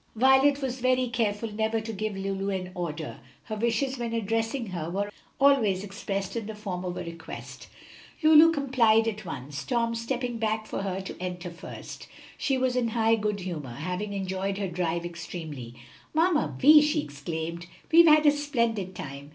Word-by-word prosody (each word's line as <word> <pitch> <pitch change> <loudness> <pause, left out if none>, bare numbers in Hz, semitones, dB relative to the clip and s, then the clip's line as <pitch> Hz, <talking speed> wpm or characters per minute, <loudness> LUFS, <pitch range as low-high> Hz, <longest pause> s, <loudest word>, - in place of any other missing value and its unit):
Violet 265 +4 +4
was 260 -1 -2
very 255 0 +2
careful 225 -2 -1
never 220 +1 0
to 220 0 -5
give 215 0 -3
Lulu 195 0 -2
an 185 -2 -3
order; 165 -4 -5 0.2
her 215 - -5
wishes 235 +4 0
when 235 -1 -3
addressing 225 +3 -1
her 170 -3 -4
were 200 +3 -2 0.3
always 235 -9 +4
expressed 195 -1 -4
in 225 -3 -3
the 220 - -6
form 190 -4 -5
of 180 -1 -4
a - - -3
request. 170 -1 -9 0.6
Lulu 315 +1 +8
complied 245 -7 +3
at 215 -2 -3
once, 140 -3 -6
Tom 230 - 0
stepping 240 +1 -3
back 220 -1 0
for 215 - -4
her 195 -1 -2
to 190 - -7
enter 180 -1 -4
first. 170 - -9 0.3
She 270 -2 0
was 255 -1 +1
in 245 -2 +1
high 225 0 +2
good 210 -2 0
humor, 155 -9 -5
having 180 +7 -3
enjoyed 195 0 -2
her 200 -1 -1
drive 170 -1 -2
extremely. 160 -8 -7 0.4
"Mamma 325 -1 +2
Vi," 300 +3 +8
she 300 +1 +1
exclaimed, 160 +4 -5 0.2
"we've 335 +1 +8
had 305 0 +6
a 295 - +8
splendid 235 -10 -1
time! 140 -2 -7
215 Hz, 175 wpm, -27 LUFS, 180-245 Hz, 0.6 s, Lulu